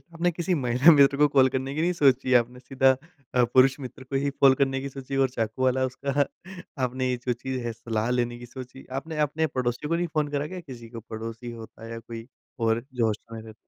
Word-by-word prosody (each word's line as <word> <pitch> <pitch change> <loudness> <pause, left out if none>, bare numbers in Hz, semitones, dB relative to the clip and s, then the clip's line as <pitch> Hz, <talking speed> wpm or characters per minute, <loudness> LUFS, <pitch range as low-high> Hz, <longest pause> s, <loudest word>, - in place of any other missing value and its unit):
आपने 175 +2 +1
किसी 170 +2 -1
महिला 125 +1 +5
मित्र 140 -1 +5
को 150 +1 +5
कॉल 135 -2 +5
करने 130 +1 -3
की 155 - -2
नहीं 175 +2 +2
सोची? 135 -5 +3
आपने 125 +1 +2
सीधा 135 +1 +3 0.4
अ, 125 - +5
पुरुष 130 +3 +4
मित्र 130 -1 -8
को 135 +1 -3
ही 140 - +1
कॉल 135 -1 +7
करने 135 -1 +2
की 140 - -4
सोची 135 0 -6
और 130 - +2
चाकू 115 +1 -2
वाला 130 0 +2
उसका 140 +2 0 0.6
आपने 130 +1 -2
ये 125 - 0
जो 125 - +2
चीज़ 130 +2 -4
है, 115 - -2
सलाह 110 0 -2
लेने 120 -1 0
की 120 - -10
सोची। 130 +1 -10
आपने 160 +1 -7
अपने 160 +2 0
पड़ोसियों 120 +3 -1
को 170 - +2
नहीं 175 0 0
फ़ोन 150 -1 +1
करा 145 +1 0
क्या 185 - -5
किसी 125 -8 -10
को? 115 0 -8
पड़ोसी 115 +2 -7
होता 115 0 -11
है 115 - -8
या 115 - -5
कोई 115 0 -9 0.4
और 115 +2 +1
जो 120 -3 +1
हॉस्टल 110 +1 -4
में 110 - -7
रह 110 0 -11
130 Hz, 235 wpm, -26 LUFS, 120-140 Hz, 0.6 s, कॉल